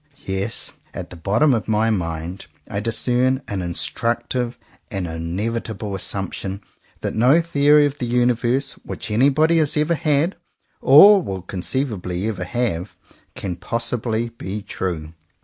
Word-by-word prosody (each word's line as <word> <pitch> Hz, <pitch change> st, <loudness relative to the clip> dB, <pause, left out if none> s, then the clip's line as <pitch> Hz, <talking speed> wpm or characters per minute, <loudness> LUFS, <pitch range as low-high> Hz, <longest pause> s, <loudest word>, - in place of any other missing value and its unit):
Yes, 95 Hz, +3 st, -2 dB, 0.2 s
at 90 Hz, -1 st, -6 dB
the -, -, -8 dB
bottom 105 Hz, -, +2 dB
of 115 Hz, -, -1 dB
my 110 Hz, +1 st, +2 dB
mind 85 Hz, -1 st, -3 dB, 0.2 s
I 100 Hz, -, -3 dB
discern 125 Hz, +4 st, +1 dB
an 100 Hz, -4 st, -3 dB
instructive 120 Hz, +7 st, -1 dB, 0.3 s
and 95 Hz, -4 st, -3 dB
inevitable 100 Hz, +6 st, -3 dB
assumption 95 Hz, 0 st, -4 dB, 0.4 s
that -, -, -2 dB
no 125 Hz, +8 st, +5 dB
theory 150 Hz, -3 st, +4 dB
of 145 Hz, 0 st, -3 dB
the 125 Hz, -, -2 dB
universe 120 Hz, +2 st, +1 dB
which -, -, -6 dB
anybody 145 Hz, +8 st, +4 dB
has 150 Hz, -1 st, +1 dB
ever 150 Hz, +3 st, +2 dB
had, 155 Hz, +2 st, +1 dB, 0.4 s
or 195 Hz, +9 st, +8 dB
will 95 Hz, -, -5 dB
conceivably 95 Hz, -1 st, -2 dB
ever 95 Hz, -5 st, -3 dB
have, 100 Hz, -4 st, -2 dB, 0.4 s
can 90 Hz, -3 st, -4 dB
possibly 115 Hz, +3 st, -2 dB
be 105 Hz, -3 st, -6 dB
true. 80 Hz, -5 st, -4 dB
115 Hz, 130 wpm, -21 LUFS, 95-130 Hz, 0.4 s, or